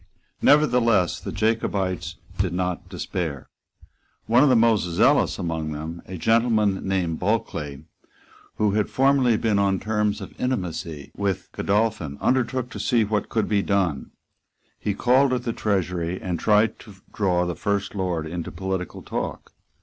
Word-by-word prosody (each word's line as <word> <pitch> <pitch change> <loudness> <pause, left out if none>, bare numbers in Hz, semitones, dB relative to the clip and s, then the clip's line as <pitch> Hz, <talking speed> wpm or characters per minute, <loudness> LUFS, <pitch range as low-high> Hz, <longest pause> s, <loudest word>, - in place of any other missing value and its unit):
Nevertheless, 120 - +4
the - - -6
Jacobites 95 -5 -1 0.2
did 95 -3 0
not 90 -1 -2
despair. 85 -5 -4 0.8
One 120 +3 +4
of 145 - +5
the 130 - +5
most 115 -2 +4
zealous 85 -1 +3
among 80 -2 -3
them, 80 +3 -6
a 95 - -6
gentleman 110 -1 +2
named 90 -4 0
Bulkeley, 80 -9 -2 0.7
who 105 -1 +2
had 105 0 0
formerly 135 -3 +3
been 105 -3 +1
on 100 -2 +2
terms 105 0 0
of - - -9
intimacy 85 - -3
with 100 -2 -2
Godolphin, 100 -8 0
undertook 130 -1 0
to - - -7
see 120 -3 +2
what 105 -1 -1
could 110 -2 0
be 105 -2 +2
done. 95 -9 0 0.7
He 105 - -2
called 130 +3 +3
at 125 -1 -1
the 115 - -2
Treasury, 90 -4 -1
and 90 -3 -3
tried 105 +1 +3
to 105 -3 -13 0.2
draw 90 -4 +1
the 90 -1 -3
First 100 0 -1
Lord 90 -5 -2
into 85 +1 -5
political 95 -1 -4
talk. - - -5
100 Hz, 150 wpm, -24 LUFS, 90-115 Hz, 0.8 s, of